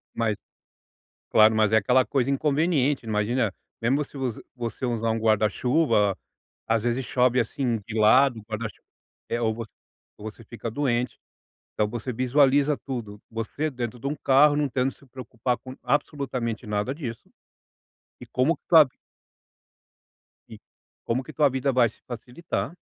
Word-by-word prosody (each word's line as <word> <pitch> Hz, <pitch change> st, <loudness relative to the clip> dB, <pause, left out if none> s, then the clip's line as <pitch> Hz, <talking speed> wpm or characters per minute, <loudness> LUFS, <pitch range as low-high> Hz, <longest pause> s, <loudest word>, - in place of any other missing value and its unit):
Mas 110 Hz, -2 st, 0 dB, 0.9 s
claro, 110 Hz, 0 st, +6 dB
mas 110 Hz, -1 st, +3 dB
é -, -, +7 dB
aquela 125 Hz, +5 st, +3 dB
coisa 135 Hz, -2 st, 0 dB
inconveniente. 145 Hz, -1 st, +1 dB
Imagina, 110 Hz, 0 st, 0 dB, 0.3 s
mesmo 135 Hz, +6 st, +2 dB
se 140 Hz, -, -12 dB
voc 130 Hz, -3 st, -1 dB
se -, -, -11 dB
você 120 Hz, 0 st, -4 dB
usar 115 Hz, -2 st, 0 dB
um 115 Hz, -, 0 dB
guarda-chuva, 110 Hz, -, +2 dB, 0.5 s
às 110 Hz, -1 st, +1 dB
vezes 120 Hz, +2 st, -1 dB
chove, 125 Hz, 0 st, +2 dB
assim, 120 Hz, 0 st, -1 dB
de 110 Hz, -, -6 dB
lado, 125 Hz, +3 st, +5 dB
o -, -, -14 dB
guarda-chuva 110 Hz, 0 st, -6 dB, 0.4 s
é, 120 Hz, -, -1 dB
ou 110 Hz, -1 st, +1 dB
vo 115 Hz, -, -5 dB, 0.5 s
ou 110 Hz, +1 st, -6 dB
você 115 Hz, -, -16 dB
fica 115 Hz, +1 st, -6 dB
doente. 125 Hz, -1 st, -1 dB, 0.6 s
Então, 105 Hz, 0 st, 0 dB, 0.2 s
visualiza 140 Hz, +3 st, +3 dB
tudo: 110 Hz, -6 st, -6 dB
você 115 Hz, +7 st, -3 dB
dentro 120 Hz, -2 st, -5 dB
de 135 Hz, -, -6 dB
um 145 Hz, -, -1 dB
carro, 145 Hz, +2 st, +5 dB
não 150 Hz, -1 st, +1 dB
tendo 130 Hz, +1 st, 0 dB
se 140 Hz, -, -21 dB
preocupar 125 Hz, -1 st, -3 dB
com 130 Hz, +2 st, -10 dB
absolutamente 125 Hz, -4 st, -2 dB
nada 105 Hz, +5 st, -1 dB
disso. 120 Hz, -7 st, -7 dB, 0.9 s
E -, -, -10 dB
como 145 Hz, +6 st, +1 dB
que -, -, -46 dB
tua 160 Hz, -3 st, +8 dB
vi 130 Hz, -, -14 dB, 1.6 s
E -, -, -11 dB, 0.5 s
como 125 Hz, +3 st, -1 dB
que 155 Hz, -, -11 dB
tua 150 Hz, -2 st, +4 dB
vida 135 Hz, +1 st, 0 dB
vai 125 Hz, -3 st, +4 dB
se -, -, -23 dB
facilitar. 125 Hz, -, -5 dB
125 Hz, 155 wpm, -25 LUFS, 110-135 Hz, 1.6 s, tua